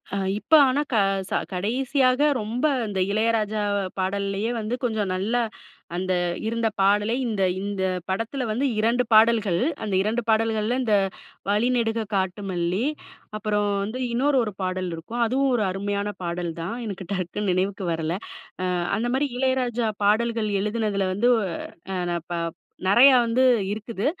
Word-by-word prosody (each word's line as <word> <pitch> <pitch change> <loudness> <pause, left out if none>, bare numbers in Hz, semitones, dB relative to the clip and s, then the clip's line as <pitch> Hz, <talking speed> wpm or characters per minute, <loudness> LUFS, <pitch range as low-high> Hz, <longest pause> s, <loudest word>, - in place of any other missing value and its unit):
ஆ. - - 0 0.2
இப்ப 320 - -5
ஆனா 275 +3 +1
க - - +2 0.3
ச - - -22 0.2
கடைசியாக 255 +6 +1 0.2
ரொம்ப 225 +6 -2 0.2
இந்த 195 -2 -3
இளையராஜா 215 -1 +1 0.4
பாடலேயே 200 +3 -1
வந்து 220 +3 -2
கொஞ்சம் 220 -5 0
நல்ல 200 +6 -1 0.6
அந்த 185 +1 -1 0.3
இருந்த 230 0 0
பாடலே 205 +3 +3
இந்த 210 -4 0 0.2
இந்த 200 -1 -3 0.3
படத்துல 225 +7 -2
வந்து 245 +6 0
2 235 +3 +2
பாடல்கள், 220 -5 +5 0.2
அந்த 205 -3 -3
2 220 +4 0
பாடல்கள்ல 220 +1 +1
இந்த, 220 -4 +2 0.5
"வழிநெடுக 225 0 +1
காட்டு 190 +1 -1
மல்லி" 180 +6 0 0.5
அப்புறம் 210 0 0 0.2
வந்து 225 +5 -4
இன்னொரு 270 +3 +2
1 210 -3 -4
பாடல் 185 0 -2
இருக்கும். 225 +9 -5
அதுவும் 265 +3 +1
ஒரு 220 - +1
அருமையான 200 +2 -2
பாடல் 170 0 -2
தான். 180 +7 -3
எனக்கு 195 -3 -6
டக்குன்னு 185 +2 -2
நினைவுக்கு 190 +1 -1
வரல. 160 +1 -2 0.5
ஆ - - 0 0.3
அந்தமாரி 250 +5 0
இளையராஜா 250 -3 +1 0.2
பாடல்கள் 225 +1 +2
எழுதுனதுல 210 -2 -1
வந்து 235 +6 +2 0.6
ஆ - - -1
ந - - 0 0.2
ப - - -1 0.5
நெறையா 255 +6 +7
வந்து 235 +3 +2 0.3
இருக்குது. 215 -1 -5
215 Hz, 140 wpm, -24 LUFS, 195-235 Hz, 0.6 s, நெறையா